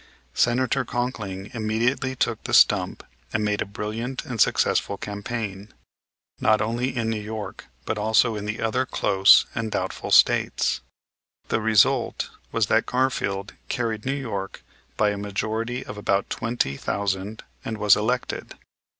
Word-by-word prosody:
Senator 130 Hz, -, +2 dB
Conkling 105 Hz, -7 st, -4 dB
immediately 120 Hz, +4 st, 0 dB
took -, -, -1 dB
the -, -, +1 dB
stump -, -, +4 dB, 0.3 s
and 105 Hz, -, 0 dB
made 105 Hz, 0 st, 0 dB
a -, -, -2 dB
brilliant 110 Hz, +5 st, -4 dB
and 120 Hz, -4 st, -2 dB
successful -, -, +2 dB
campaign, 105 Hz, -1 st, -5 dB, 0.7 s
not 110 Hz, 0 st, +3 dB
only 120 Hz, +5 st, -1 dB
in 115 Hz, -1 st, 0 dB
New 110 Hz, -1 st, -1 dB
York 110 Hz, 0 st, -7 dB, 0.2 s
but 110 Hz, -, -2 dB
also 110 Hz, +2 st, +3 dB
in 105 Hz, 0 st, -5 dB
the 105 Hz, +1 st, -3 dB
other 115 Hz, +3 st, +1 dB
close 95 Hz, +1 st, +5 dB
and 115 Hz, -1 st, -2 dB
doubtful -, -, -3 dB
States. -, -, +3 dB, 0.7 s
The 115 Hz, -, +1 dB
result 110 Hz, -2 st, +2 dB, 0.2 s
was -, -, +2 dB
that -, -, +2 dB
Garfield 105 Hz, -6 st, -1 dB, 0.2 s
carried 115 Hz, -3 st, -2 dB
New 135 Hz, +1 st, -1 dB
York 100 Hz, -7 st, -5 dB, 0.3 s
by 105 Hz, -1 st, +3 dB
a 100 Hz, -, -4 dB
majority 110 Hz, +4 st, -3 dB
of 105 Hz, -, -7 dB
about 100 Hz, -1 st, 0 dB
twenty 115 Hz, -, -1 dB
thousand 100 Hz, +1 st, -2 dB, 0.2 s
and 110 Hz, -, -4 dB
was 105 Hz, -2 st, +6 dB
elected. 125 Hz, +4 st, -2 dB
110 Hz, 140 wpm, -24 LUFS, 105-120 Hz, 0.7 s, was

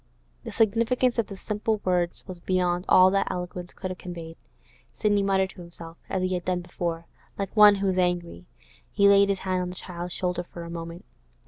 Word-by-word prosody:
The -, -, -6 dB
significance 235 Hz, +3 st, +2 dB
of 225 Hz, -, 0 dB
the 200 Hz, -, -8 dB
simple 210 Hz, +2 st, -2 dB
words 175 Hz, -2 st, 0 dB
was 185 Hz, -2 st, -8 dB
beyond 180 Hz, 0 st, 0 dB
all 185 Hz, 0 st, +7 dB
that 195 Hz, 0 st, +1 dB
eloquence 180 Hz, 0 st, -5 dB
could 185 Hz, -1 st, -6 dB
have 185 Hz, -, -8 dB
conveyed. 170 Hz, -2 st, -8 dB, 0.6 s
Sidney 205 Hz, -2 st, +2 dB
muttered 190 Hz, -1 st, +1 dB
to 180 Hz, -, -12 dB
himself, 170 Hz, -1 st, -11 dB
as 185 Hz, -, -1 dB
he 185 Hz, 0 st, 0 dB
had 180 Hz, -1 st, -2 dB
done 180 Hz, 0 st, -1 dB
before, 170 Hz, -1 st, -4 dB, 0.3 s
like 200 Hz, 0 st, -4 dB
one 210 Hz, -1 st, +8 dB
who 195 Hz, 0 st, -1 dB
is 185 Hz, -1 st, +1 dB
angry. 175 Hz, -, -1 dB, 0.4 s
He 200 Hz, -, +4 dB
laid 200 Hz, 0 st, +6 dB
his 200 Hz, -, +1 dB
hand 185 Hz, -1 st, 0 dB
on 180 Hz, -, -3 dB
the 180 Hz, -, -8 dB
child's 175 Hz, -1 st, -7 dB
shoulder 180 Hz, -1 st, -1 dB
for 175 Hz, -1 st, -10 dB
a 170 Hz, -, -8 dB
moment. 170 Hz, 0 st, -7 dB
185 Hz, 205 wpm, -26 LUFS, 175-200 Hz, 0.6 s, one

